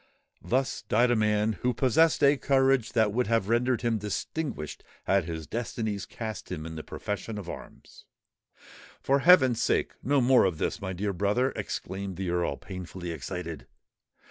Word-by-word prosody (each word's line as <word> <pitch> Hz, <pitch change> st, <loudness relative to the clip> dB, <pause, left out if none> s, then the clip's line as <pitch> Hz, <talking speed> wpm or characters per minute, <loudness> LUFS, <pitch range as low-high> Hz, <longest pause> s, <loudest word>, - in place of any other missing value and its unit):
_"—"_Thus 130 Hz, +2 st, 0 dB
died 120 Hz, +3 st, +4 dB
a -, -, +4 dB
man 105 Hz, 0 st, +2 dB
who 125 Hz, -1 st, +1 dB
possessed 150 Hz, +6 st, +3 dB
a 140 Hz, +1 st, +6 dB
courage 135 Hz, -3 st, +2 dB
that 110 Hz, -3 st, +2 dB
would 125 Hz, 0 st, +1 dB
have 115 Hz, -3 st, +1 dB
rendered 120 Hz, +1 st, +1 dB
him 115 Hz, -2 st, +1 dB
distinguished 105 Hz, -, -4 dB, 0.2 s
had 95 Hz, -3 st, +2 dB
his 80 Hz, -2 st, -5 dB
destinies 110 Hz, 0 st, -3 dB
cast 110 Hz, -5 st, -6 dB
him 80 Hz, -3 st, -4 dB
in 80 Hz, -, -6 dB
the 80 Hz, -, -5 dB
profession 105 Hz, +6 st, -5 dB
of 100 Hz, -4 st, -7 dB
arms._" -, -, -11 dB, 0.9 s
"For 140 Hz, +1 st, +2 dB
heaven's 130 Hz, -8 st, +6 dB
sake, -, -, +1 dB
no 140 Hz, +2 st, +2 dB
more 130 Hz, -2 st, +5 dB
of 90 Hz, -4 st, 0 dB
this, -, -, -2 dB
my 95 Hz, -, -3 dB
dear 100 Hz, +2 st, -2 dB
brother," 105 Hz, +8 st, +1 dB
exclaimed 95 Hz, -1 st, -5 dB
the 95 Hz, -2 st, -2 dB
Earl, 85 Hz, -5 st, 0 dB
painfully 90 Hz, -1 st, -7 dB
excited. 80 Hz, -3 st, -6 dB
110 Hz, 165 wpm, -28 LUFS, 95-125 Hz, 0.9 s, a